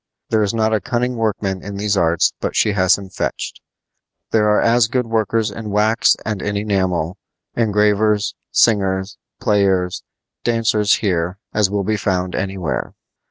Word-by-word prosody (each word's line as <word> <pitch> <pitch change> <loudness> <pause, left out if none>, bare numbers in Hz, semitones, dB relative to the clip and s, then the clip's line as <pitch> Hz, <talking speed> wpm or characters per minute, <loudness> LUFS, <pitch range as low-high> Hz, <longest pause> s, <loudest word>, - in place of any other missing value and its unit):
There 110 - +2
is 105 - +1
not 110 -1 +1
a 110 - +1
cunning 125 +1 -1
workman 100 -4 -1
in 100 0 -7
these 105 0 0
arts 85 -3 +2
but - - -3
she 105 - +3
has 95 -2 +3
him 100 -1 -9
fetched. - - -4 0.7
There 105 -1 +3
are 105 - +4
as 115 0 +3
good 125 +1 -1
workers 110 -1 0
in 105 +1 -7
wax 105 +3 +3
and 105 -3 -3
in 100 0 -2
enamel, 95 -3 -1 0.4
engravers, 105 -1 +2 0.2
singers, 95 -3 +1 0.2
players, 95 -3 +1 0.4
dancers 110 -3 +2
here 90 -3 -1 0.2
as 105 -3 +2
will 100 0 -1
be 110 +2 0
found 90 -2 -1
anywhere. 95 -7 -3
105 Hz, 155 wpm, -19 LUFS, 95-110 Hz, 0.7 s, are